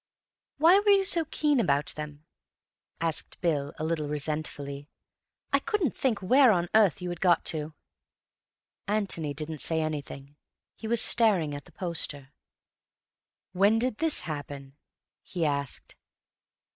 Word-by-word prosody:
"Why 335 Hz, +6 st, +6 dB
were 410 Hz, 0 st, 0 dB
you 395 Hz, -1 st, +5 dB
so 345 Hz, -4 st, +3 dB
keen 295 Hz, -4 st, +1 dB
about 145 Hz, -9 st, +1 dB
them?" 150 Hz, 0 st, -8 dB, 0.7 s
asked 165 Hz, -2 st, -3 dB
Bill 145 Hz, -5 st, -1 dB
a -, -, -5 dB
little 160 Hz, -2 st, -1 dB
resentfully. 145 Hz, -1 st, -4 dB, 0.6 s
"I -, -, +5 dB
couldn't 420 Hz, -, -1 dB
think 230 Hz, -7 st, -1 dB
where 255 Hz, +5 st, +6 dB
on 175 Hz, -3 st, 0 dB
earth 205 Hz, -6 st, +3 dB
you 180 Hz, -, -3 dB
had 175 Hz, -1 st, -6 dB
got 175 Hz, -3 st, +3 dB
to." 155 Hz, 0 st, -5 dB, 1.1 s
Antony 195 Hz, -8 st, -1 dB
didn't 155 Hz, +1 st, -5 dB
say 160 Hz, +3 st, 0 dB
anything. 145 Hz, -2 st, -5 dB, 0.4 s
He 220 Hz, -, -8 dB
was 235 Hz, 0 st, +1 dB
staring 195 Hz, -10 st, +3 dB
at 145 Hz, -1 st, -7 dB
the -, -, -18 dB
poster. 150 Hz, -6 st, -3 dB, 1.2 s
"When 200 Hz, +4 st, +3 dB
did 245 Hz, -1 st, -1 dB
this 325 Hz, -1 st, +1 dB
happen?" 145 Hz, -3 st, -7 dB, 0.5 s
he 170 Hz, -3 st, -3 dB
asked. 140 Hz, -2 st, -2 dB
165 Hz, 135 wpm, -28 LUFS, 145-220 Hz, 1.2 s, Why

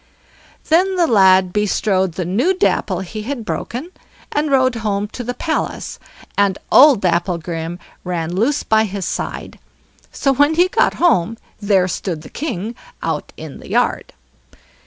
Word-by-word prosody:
Then 370 Hz, +4 st, +3 dB
the 350 Hz, -2 st, +3 dB
lad 190 Hz, -, +4 dB
bestrode 195 Hz, -3 st, +1 dB
the 180 Hz, +1 st, -3 dB
new 245 Hz, -, +1 dB
Dapple 190 Hz, -, 0 dB
he 215 Hz, +4 st, -6 dB
had 240 Hz, 0 st, -5 dB
broken, 260 Hz, +10 st, -4 dB, 0.4 s
and 295 Hz, +1 st, 0 dB
rode 260 Hz, -2 st, +3 dB
home 205 Hz, -2 st, -1 dB
to 245 Hz, -, -7 dB
the 245 Hz, +1 st, -4 dB
palace, 320 Hz, -2 st, -3 dB, 0.4 s
and 200 Hz, -1 st, +2 dB
old 270 Hz, -5 st, +7 dB
Dapplegrim 170 Hz, -1 st, -1 dB, 0.3 s
ran 175 Hz, -2 st, -3 dB
loose 240 Hz, +10 st, +1 dB
by 220 Hz, 0 st, +3 dB
his 195 Hz, -2 st, -4 dB
side. -, -, -5 dB, 0.5 s
So 275 Hz, -, +1 dB
when 290 Hz, +4 st, +3 dB
he 355 Hz, +2 st, +4 dB
got -, -, +2 dB
home, 230 Hz, -, +2 dB, 0.2 s
there 195 Hz, -3 st, +2 dB
stood 170 Hz, -3 st, -4 dB
the -, -, -12 dB
king 225 Hz, -, -4 dB, 0.3 s
out -, -, -3 dB
in -, -, -9 dB
the -, -, -12 dB
yard. -, -, 0 dB
210 Hz, 150 wpm, -18 LUFS, 185-275 Hz, 0.5 s, old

